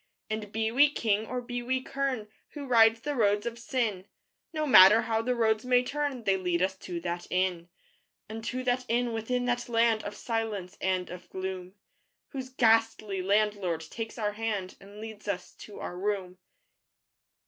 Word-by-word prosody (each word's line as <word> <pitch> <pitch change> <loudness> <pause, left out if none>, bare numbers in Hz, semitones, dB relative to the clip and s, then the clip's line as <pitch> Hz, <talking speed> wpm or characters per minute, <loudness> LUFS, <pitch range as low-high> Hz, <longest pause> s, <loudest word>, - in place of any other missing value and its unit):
And 215 -2 -4
be 220 0 -1
we 285 +5 +6
king 220 -6 0
or 250 0 -3
be 245 0 -4
we 260 +2 0
kern 260 -4 -2 0.3
Who 290 -1 -5
ride 225 -3 +6
the 285 +6 -4
roads 205 -5 +2
of 235 0 -4
Sin, 230 -8 -2 0.4
No 310 -2 -1
matter 215 -4 +8
how 225 -1 0
the 250 +2 0
roads 220 -2 +2
may 250 0 +3
turn 280 -2 -2
They 195 -2 +2
lead 180 -1 0
us 190 0 0
to 175 -2 -5
that 175 0 -4
Inn: 180 -2 0 0.6
Unto 225 +4 -4
that 250 0 +1
Inn 240 0 +1
within 245 +3 -1
that 245 0 -1
land 230 -1 +3
Of 205 - -6
silence 210 -5 -3
and 185 -2 0
of 180 0 -10
gloom, 185 0 -5 0.5
Whose 260 -2 -6
ghastly 225 -5 +2
Landlord 200 -4 +1
takes 225 0 -6
our 210 -2 0
hand 210 -3 -3
And 200 +1 -13
leads 220 -1 -9
us 200 -3 -3
to 210 - -11
our 175 - -5
room. 185 -1 -3
220 Hz, 170 wpm, -29 LUFS, 195-245 Hz, 0.6 s, matter